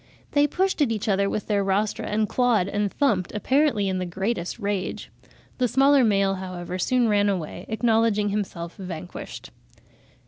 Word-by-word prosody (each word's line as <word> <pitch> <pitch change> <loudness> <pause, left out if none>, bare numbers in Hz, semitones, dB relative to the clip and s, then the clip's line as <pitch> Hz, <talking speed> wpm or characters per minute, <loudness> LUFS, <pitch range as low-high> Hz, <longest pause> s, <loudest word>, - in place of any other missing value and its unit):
They 290 0 +4
pushed 375 +2 0
at 270 -6 +3
each 215 -1 -3
other 200 -1 +2
with 210 - -3
their 205 -2 +1
rostra, 200 +2 0
and 215 +1 0
clawed 240 -7 +2
and 205 0 -1
thumped, 210 -11 +1
apparently 260 -1 +2
in 190 -1 -1
the 180 - -2
greatest 190 +1 -3
rage." 200 -4 -3 0.5
The 250 - +3
smaller 270 +3 +4
male, 200 -3 +2
however, 185 -1 -5
"soon 245 +5 +2
ran 205 -1 +3
away, 180 -2 -4
acknowledging 220 -2 +2
himself 185 -5 -4
vanquished." 180 - -8
205 Hz, 160 wpm, -24 LUFS, 190-235 Hz, 0.5 s, They